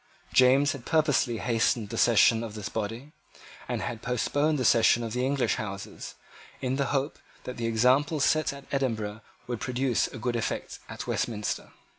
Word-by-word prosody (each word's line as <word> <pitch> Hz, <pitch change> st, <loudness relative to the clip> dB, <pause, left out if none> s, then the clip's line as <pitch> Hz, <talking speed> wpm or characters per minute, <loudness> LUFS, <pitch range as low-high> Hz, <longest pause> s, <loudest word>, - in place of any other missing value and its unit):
James 135 Hz, +3 st, +5 dB
had 140 Hz, -4 st, -7 dB
purposely 145 Hz, -7 st, +2 dB
hastened 115 Hz, -2 st, 0 dB
the -, -, -5 dB
session 115 Hz, 0 st, +5 dB
of 110 Hz, -2 st, -7 dB
this 105 Hz, -1 st, -5 dB
body, 115 Hz, +6 st, -5 dB, 0.6 s
and -, -, -2 dB
had 115 Hz, -2 st, -4 dB
postponed 145 Hz, +5 st, 0 dB
the 130 Hz, -, -1 dB
session 115 Hz, +1 st, +4 dB
of 115 Hz, -2 st, -4 dB
the 125 Hz, +1 st, -1 dB
English 135 Hz, 0 st, +1 dB
Houses, 100 Hz, -2 st, -6 dB, 0.4 s
in 130 Hz, 0 st, -1 dB
the 140 Hz, -, +1 dB
hope 135 Hz, +3 st, -1 dB, 0.2 s
that 125 Hz, -, -7 dB
the 115 Hz, -1 st, -2 dB
example 130 Hz, +7 st, +2 dB
set 155 Hz, +2 st, +2 dB
at 140 Hz, 0 st, -10 dB
Edinburgh 115 Hz, -6 st, -2 dB, 0.2 s
would 120 Hz, -2 st, -4 dB
produce 125 Hz, -1 st, 0 dB
a -, -, -9 dB
good 120 Hz, +2 st, -2 dB
effect 115 Hz, -, -3 dB
at -, -, -6 dB
Westminster. 105 Hz, -3 st, -2 dB
125 Hz, 170 wpm, -27 LUFS, 115-135 Hz, 0.6 s, James